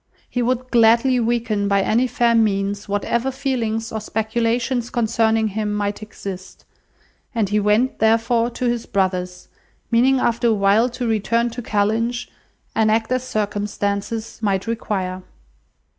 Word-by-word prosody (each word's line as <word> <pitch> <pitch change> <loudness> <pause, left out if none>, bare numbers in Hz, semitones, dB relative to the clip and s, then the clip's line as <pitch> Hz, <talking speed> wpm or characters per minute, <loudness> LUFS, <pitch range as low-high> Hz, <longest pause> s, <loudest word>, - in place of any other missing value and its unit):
He 245 - -2
would 255 +1 -1
gladly 235 +2 +4
weaken, 225 -3 0
by 200 -1 +2
any 240 +6 +2
fair 235 -1 +2
means, 200 -2 0
whatever 235 +5 0
feelings 240 -5 -2
or 220 - -3
speculations 230 +3 -1
concerning 225 -1 +1
him 210 +1 -2
might 205 0 -2
exist; 195 -3 -9 0.7
and 215 -4 +1
he 210 +1 +2
went, 210 +5 +1
therefore, 230 +2 +2
to 250 +1 -4
his 240 -1 -1
brother's, 185 -2 -1 0.4
meaning 255 +3 +4
after 235 -1 +1
a 230 - +4
while 205 +4 +3
to 245 0 -4
return 230 +2 +1
to 245 +2 -6
Kellynch, 225 +3 -1 0.4
and 220 -1 +2
act 220 +2 +1
as 255 0 +1
circumstances 205 0 -3
might 195 -3 0
require. 195 -5 -3
225 Hz, 140 wpm, -21 LUFS, 205-235 Hz, 0.7 s, gladly